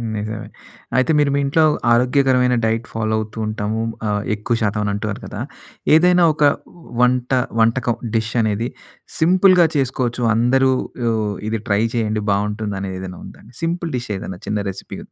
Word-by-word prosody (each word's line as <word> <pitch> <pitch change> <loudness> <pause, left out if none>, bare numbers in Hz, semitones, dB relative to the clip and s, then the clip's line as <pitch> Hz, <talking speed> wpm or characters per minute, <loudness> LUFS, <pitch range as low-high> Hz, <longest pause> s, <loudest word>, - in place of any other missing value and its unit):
నిజమే. 110 +1 -5 0.5
అయితే 130 +5 +3
మీరు 145 -1 +3
మీ - - +2
ఇంట్లో 150 +4 +3 0.3
ఆరోగ్యకరమైన 125 0 +3
డైట్ 115 +1 0
ఫాలో 110 -1 0
అవుతూ 110 0 -7
ఉంటాము. 110 +1 -2 0.3
ఆహ్, 105 0 0
ఎక్కువ 105 +3 -1
శాతం 105 0 0
అని 100 - -1
అంటున్నారు 105 0 -4
కదా! 105 - -6 0.5
ఏదైనా 180 +2 +5
ఒక 150 - -1 0.6
వంట, 125 0 +2 0.3
వంటకం 120 +1 +2 0.2
డిష్ 115 +1 -1
అనేది, 110 +1 0 0.5
సింపుల్‌గా 180 +1 +5
చేసుకోచ్చు. 125 -3 -1
అందరూ 130 +3 +3 0.4
ఊ - - +3 0.4
ఇది 110 -1 -1
ట్రై 100 0 +2
చేయండి 110 -2 -1
బావుంటుందని 100 -1 -2
ఏదైనా 90 -1 -7
ఉందా? - - -13 0.2
సింపుల్ 170 0 -2
డిష్ 120 -2 -6
ఏదైనా 95 -1 -7
చిన్న 105 0 -1
రెసిపీ? 95 0 -8
115 Hz, 145 wpm, -20 LUFS, 105-130 Hz, 0.6 s, ఏదైనా